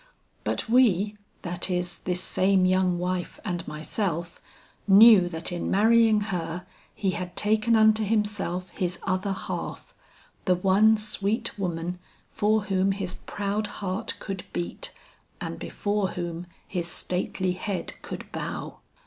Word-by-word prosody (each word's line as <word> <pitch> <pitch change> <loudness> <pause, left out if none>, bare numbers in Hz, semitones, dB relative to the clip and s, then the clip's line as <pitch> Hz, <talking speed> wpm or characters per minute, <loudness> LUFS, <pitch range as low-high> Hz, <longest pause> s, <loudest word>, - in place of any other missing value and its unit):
But - - -1
we, 215 -4 +4 0.3
that 175 0 -2
is, 180 -1 -1
this 180 0 -1
same 190 0 +3
young 185 -1 +2
wife 180 0 -2
and 175 -4 -3
myself, 170 +2 -3 0.5
knew 200 -2 +8
that 165 +1 -3
in 175 - -2
marrying 220 +1 +5
her 175 0 -3 0.3
he 195 -3 0
had 180 -2 -5
taken 215 +2 +3
unto 220 0 +5
himself 205 -4 -1
his 180 -2 -2
other 185 +1 0
half, 190 - -5 0.5
the 185 - +4
one 200 +4 +4
sweet 215 +2 -1
woman 175 -1 -2 0.3
for 215 0 +1
whom 195 -1 +1
his 190 -2 -3
proud 205 +2 -3
heart 195 +2 -4
could 195 -3 -5
beat 175 - -4 0.5
and - - -5
before 205 -1 -1
whom 175 0 -4 0.2
his 175 -3 -2
stately 180 +1 -2
head 185 +1 -4
could - - -7
bow. - - -5
190 Hz, 130 wpm, -26 LUFS, 180-210 Hz, 0.5 s, knew